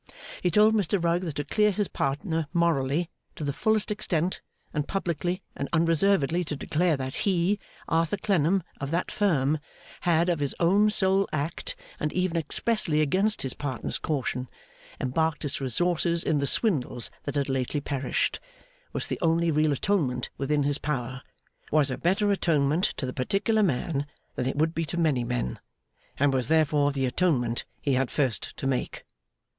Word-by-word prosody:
He 180 Hz, -, +2 dB
told 210 Hz, +5 st, +5 dB
Mr 205 Hz, -2 st, +1 dB
Rugg 170 Hz, +1 st, +2 dB
that 160 Hz, -4 st, -4 dB
to 145 Hz, -, -2 dB
clear 210 Hz, +8 st, +2 dB
his 205 Hz, 0 st, 0 dB
partner 160 Hz, +3 st, -1 dB
morally, 165 Hz, -1 st, +1 dB, 0.2 s
to -, -, -6 dB
the 140 Hz, -1 st, -1 dB
fullest 220 Hz, +3 st, +1 dB
extent, 185 Hz, -4 st, -1 dB, 0.3 s
and 150 Hz, -1 st, -1 dB
publicly 180 Hz, 0 st, -2 dB
and 140 Hz, -, -4 dB
unreservedly 170 Hz, 0 st, +3 dB
to 150 Hz, -, -4 dB
declare 160 Hz, +2 st, +1 dB
that 130 Hz, 0 st, -4 dB
he, 190 Hz, +1 st, +1 dB, 0.3 s
Arthur 165 Hz, +4 st, +1 dB
Clennam, 190 Hz, -2 st, +2 dB, 0.2 s
of 140 Hz, -, -3 dB
that 170 Hz, +3 st, -1 dB
Firm, 155 Hz, -7 st, +2 dB, 0.4 s
had 170 Hz, 0 st, +2 dB
of 175 Hz, -3 st, +1 dB
his 145 Hz, -2 st, -1 dB
own 200 Hz, +5 st, +4 dB
sole 195 Hz, -1 st, +3 dB
act, 160 Hz, -, -3 dB, 0.2 s
and 150 Hz, -, -1 dB
even 180 Hz, -1 st, 0 dB
expressly 165 Hz, +1 st, +1 dB
against 190 Hz, +9 st, +2 dB
his 130 Hz, -, -2 dB
partner's 135 Hz, -4 st, -3 dB
caution, 130 Hz, -4 st, -2 dB, 0.5 s
embarked 155 Hz, +4 st, 0 dB
its 140 Hz, -, -3 dB
resources 170 Hz, +5 st, +1 dB
in 155 Hz, -3 st, +1 dB
the 140 Hz, -, 0 dB
swindles 135 Hz, -, +1 dB
that 145 Hz, -, -3 dB
had 140 Hz, -1 st, +1 dB
lately 135 Hz, +2 st, -1 dB
perished, 140 Hz, -2 st, -1 dB, 0.5 s
was -, -, -2 dB
the -, -, -3 dB
only 165 Hz, 0 st, +2 dB
real 155 Hz, 0 st, +2 dB
atonement 140 Hz, -6 st, 0 dB
within 145 Hz, +1 st, 0 dB
his 145 Hz, 0 st, 0 dB
power; 130 Hz, -3 st, -3 dB, 0.5 s
was 145 Hz, -3 st, +3 dB
a 125 Hz, -, -2 dB
better 200 Hz, +4 st, +2 dB
atonement 160 Hz, -2 st, +2 dB
to -, -, -2 dB
the 125 Hz, -, -4 dB
particular 200 Hz, -, +1 dB
man 145 Hz, -4 st, 0 dB, 0.3 s
than 125 Hz, -, -2 dB
it 130 Hz, -, -1 dB
would 160 Hz, +2 st, +1 dB
be 165 Hz, -, -1 dB
to 165 Hz, +2 st, -4 dB
many 150 Hz, -7 st, +2 dB
men; 120 Hz, -, -2 dB, 0.6 s
and 140 Hz, 0 st, +3 dB
was 130 Hz, -3 st, 0 dB
therefore 150 Hz, -2 st, +3 dB
the 135 Hz, -1 st, -1 dB
atonement 125 Hz, -5 st, +1 dB
he 140 Hz, -, 0 dB
had 130 Hz, 0 st, +1 dB
first 130 Hz, -6 st, -1 dB
to -, -, -5 dB
make. 135 Hz, -2 st, -2 dB
155 Hz, 170 wpm, -27 LUFS, 140-180 Hz, 0.6 s, told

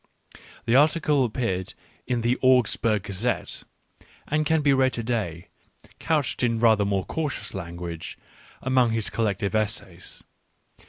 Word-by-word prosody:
The 115 Hz, -, +2 dB
article 150 Hz, -1 st, +4 dB
appeared 105 Hz, -6 st, -2 dB, 0.3 s
in 125 Hz, -2 st, 0 dB
the 120 Hz, +2 st, +2 dB
Augs 130 Hz, -3 st, +4 dB
burg 110 Hz, -4 st, 0 dB
Gazette^ 105 Hz, +4 st, -3 dB, 0.6 s
and 150 Hz, +1 st, +1 dB
it -, -, -2 dB
can 160 Hz, 0 st, +2 dB
be 140 Hz, -1 st, +4 dB
read 130 Hz, -1 st, +3 dB
to 115 Hz, -, -3 dB
day, 105 Hz, -9 st, -3 dB, 0.5 s
couched 150 Hz, -5 st, 0 dB
in 115 Hz, -2 st, +1 dB
rather 110 Hz, -3 st, +4 dB
more 100 Hz, -2 st, 0 dB
cautious 155 Hz, -3 st, -4 dB
language, 85 Hz, -1 st, -6 dB, 0.5 s
among 130 Hz, -3 st, +3 dB
his 110 Hz, -2 st, 0 dB
collected 100 Hz, -3 st, -1 dB
essays. 110 Hz, -1 st, -3 dB
115 Hz, 140 wpm, -25 LUFS, 100-130 Hz, 0.6 s, article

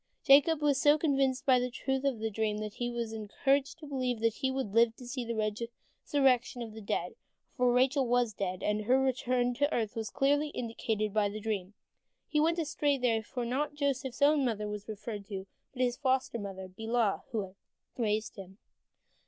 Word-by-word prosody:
Jacob 290 Hz, +2 st, +5 dB
was 280 Hz, -2 st, +3 dB
so 295 Hz, +1 st, +6 dB
convinced 275 Hz, -4 st, +1 dB
of 255 Hz, -2 st, +5 dB
the 250 Hz, -, -1 dB
truth 265 Hz, +2 st, -2 dB
of 270 Hz, -4 st, +1 dB
the 220 Hz, 0 st, -3 dB
dream 215 Hz, 0 st, -1 dB
that 215 Hz, -1 st, -5 dB
he 240 Hz, 0 st, -3 dB
was 235 Hz, -2 st, -3 dB
encouraged 270 Hz, +7 st, 0 dB
to 320 Hz, -, -11 dB
believe 255 Hz, -4 st, -2 dB
that 225 Hz, 0 st, +2 dB
he 265 Hz, -, -1 dB
would 265 Hz, -6 st, -3 dB
live 230 Hz, 0 st, +4 dB
to 250 Hz, -, -11 dB
see 250 Hz, +1 st, -4 dB
the 235 Hz, 0 st, -3 dB
resurrection 240 Hz, +4 st, 0 dB
of 225 Hz, -2 st, -8 dB
the 220 Hz, -, -9 dB
dead, 200 Hz, -, -2 dB, 0.4 s
for 250 Hz, -2 st, +3 dB
Rachel 260 Hz, +2 st, +3 dB
was 240 Hz, -2 st, +2 dB
dead, 185 Hz, -2 st, -3 dB
and 210 Hz, 0 st, 0 dB
her 255 Hz, +4 st, +4 dB
return 250 Hz, -1 st, +1 dB
to 285 Hz, +4 st, +1 dB
earth 220 Hz, -3 st, -1 dB
was 225 Hz, -1 st, -3 dB
clearly 290 Hz, +2 st, +2 dB
indicated 225 Hz, -5 st, -2 dB
by 210 Hz, -2 st, +2 dB
the 210 Hz, +1 st, -6 dB
dream. 205 Hz, -2 st, -3 dB, 0.5 s
He 300 Hz, -, +1 dB
went 330 Hz, +3 st, +2 dB
astray 295 Hz, -3 st, +1 dB
there, 235 Hz, -3 st, +1 dB
for 240 Hz, +3 st, -5 dB
not 285 Hz, +5 st, -1 dB
Joseph's 275 Hz, -2 st, -1 dB
own 290 Hz, 0 st, +5 dB
mother 215 Hz, -4 st, -1 dB
was 210 Hz, -1 st, -6 dB
referred 210 Hz, -1 st, -6 dB
to, 195 Hz, -2 st, -5 dB, 0.3 s
but 255 Hz, -1 st, -1 dB
his 245 Hz, -1 st, 0 dB
foster 260 Hz, -3 st, 0 dB
mother 190 Hz, -2 st, -6 dB
Bilhah, 220 Hz, +2 st, 0 dB
who 225 Hz, -4 st, -1 dB
had 190 Hz, -1 st, -9 dB, 0.4 s
raised 215 Hz, -3 st, -1 dB
him. 190 Hz, 0 st, -10 dB
240 Hz, 195 wpm, -31 LUFS, 215-270 Hz, 0.5 s, so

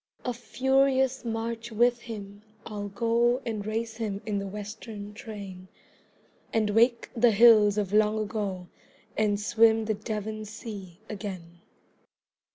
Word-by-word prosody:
A 250 Hz, -, 0 dB
furious 265 Hz, +2 st, +1 dB
march 230 Hz, 0 st, -3 dB
with 240 Hz, +2 st, +3 dB
him 205 Hz, -3 st, -8 dB, 0.2 s
I'll 205 Hz, -2 st, -5 dB
go 235 Hz, +4 st, +2 dB
And 220 Hz, -3 st, -3 dB
race 225 Hz, +1 st, -3 dB
him 210 Hz, -4 st, -3 dB
in 205 Hz, -2 st, -1 dB
the 200 Hz, -, -4 dB
Western 210 Hz, +1 st, -7 dB
train, 200 Hz, -4 st, -9 dB, 0.8 s
And 215 Hz, -2 st, +1 dB
wake 235 Hz, +2 st, +3 dB
the 240 Hz, +1 st, +5 dB
hills 215 Hz, -2 st, +6 dB
of 205 Hz, -2 st, -1 dB
long 215 Hz, 0 st, +4 dB
ago 205 Hz, -4 st, -3 dB, 0.5 s
And 210 Hz, -1 st, +1 dB
swim 225 Hz, +1 st, +4 dB
the 220 Hz, -, +1 dB
Devon 215 Hz, 0 st, -4 dB
sea 205 Hz, -4 st, -9 dB
again. 185 Hz, -5 st, -7 dB
215 Hz, 130 wpm, -28 LUFS, 205-230 Hz, 0.8 s, hills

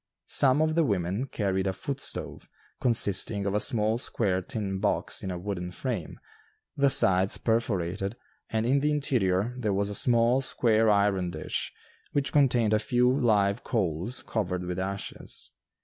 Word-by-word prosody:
Some 135 Hz, +2 st, +4 dB
of 155 Hz, 0 st, 0 dB
the 165 Hz, +1 st, +2 dB
women 100 Hz, -, -1 dB
carried 95 Hz, -5 st, -1 dB
a 95 Hz, -, -1 dB
"foot 140 Hz, +7 st, -5 dB
stove" -, -, -6 dB, 0.3 s
consisting 100 Hz, -3 st, +3 dB
of 100 Hz, -, -1 dB
a 105 Hz, -, +1 dB
small 110 Hz, +1 st, +1 dB
square 95 Hz, -7 st, 0 dB
tin 95 Hz, 0 st, -4 dB
box 100 Hz, 0 st, 0 dB
in 95 Hz, -, -5 dB
a 90 Hz, -, -4 dB
wooden 90 Hz, -1 st, -5 dB
frame, 100 Hz, -, -5 dB, 0.6 s
the 140 Hz, -1 st, +3 dB
sides 95 Hz, -6 st, +5 dB
perforated, 100 Hz, -3 st, -1 dB, 0.3 s
and 110 Hz, 0 st, -1 dB
in 135 Hz, +4 st, +2 dB
the 150 Hz, +2 st, 0 dB
interior 120 Hz, -8 st, 0 dB
there 105 Hz, -5 st, -1 dB
was 100 Hz, +1 st, -1 dB
a -, -, -3 dB
small 120 Hz, +3 st, +2 dB
square 115 Hz, -4 st, +2 dB
iron 100 Hz, -3 st, +2 dB
dish, 80 Hz, -2 st, -3 dB, 0.4 s
which 140 Hz, -1 st, -1 dB
contained 120 Hz, -7 st, +3 dB
a 105 Hz, -, +3 dB
few 125 Hz, +2 st, +2 dB
live 105 Hz, -4 st, +1 dB
coals 100 Hz, +1 st, -2 dB
covered 90 Hz, -5 st, -3 dB
with 90 Hz, +1 st, -4 dB
ashes. 100 Hz, +1 st, -5 dB
105 Hz, 160 wpm, -27 LUFS, 95-125 Hz, 0.6 s, sides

